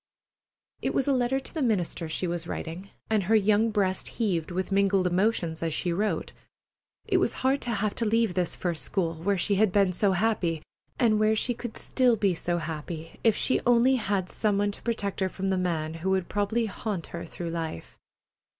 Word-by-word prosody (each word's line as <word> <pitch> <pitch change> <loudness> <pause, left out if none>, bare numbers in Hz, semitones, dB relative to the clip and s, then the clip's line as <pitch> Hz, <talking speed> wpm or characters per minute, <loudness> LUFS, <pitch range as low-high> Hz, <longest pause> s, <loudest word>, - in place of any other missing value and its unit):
It - - -1
was 270 - +1
a 280 - +4
letter 255 +1 +1
to 265 - -9
the 315 - -2
minister 180 - 0
she 165 - -1
was 170 -1 -3
writing, 175 +5 -5 0.2
and 215 -2 +3
her 220 +4 +3
young 215 +1 +4
breast 195 -3 0
heaved 185 -9 0
with 185 +2 -3
mingled 195 -1 +3
emotions 180 -3 +1
is 165 -2 -1
she 175 - 0
wrote. 210 +4 -1 0.7
It - - +2
was - - +1
hard 270 +2 +3
to - - -2
have 210 -2 0
to 230 - -2
leave 225 -2 +2
this 180 -2 0
first 170 -3 -2
school, 170 -4 -1
where 185 +5 -1
she 200 +3 +1
had 210 -1 +4
been 195 -1 +3
so 195 +2 +2
happy, 175 -6 0 0.3
and 220 -3 +3
where 215 0 +3
she 245 +3 +1
could 240 -1 -7
still 250 -3 +2
be 200 -3 +2
so 175 +1 -1
happy 160 0 -6
if 225 -3 +4
she 260 - +1
only 245 +2 +4
had 200 -5 -1
some 210 0 0
one 205 0 +1
to - - -11
protect 215 -4 -2
her 190 -1 +1
from 190 +1 -3
the 190 - +2
man 160 -3 -1
who 165 +3 -3
would 190 -2 +1
probably 205 +3 0
haunt 205 -4 -4
her 170 - -4
through 170 -1 -6
life. 165 - -5
195 Hz, 205 wpm, -27 LUFS, 175-220 Hz, 0.7 s, a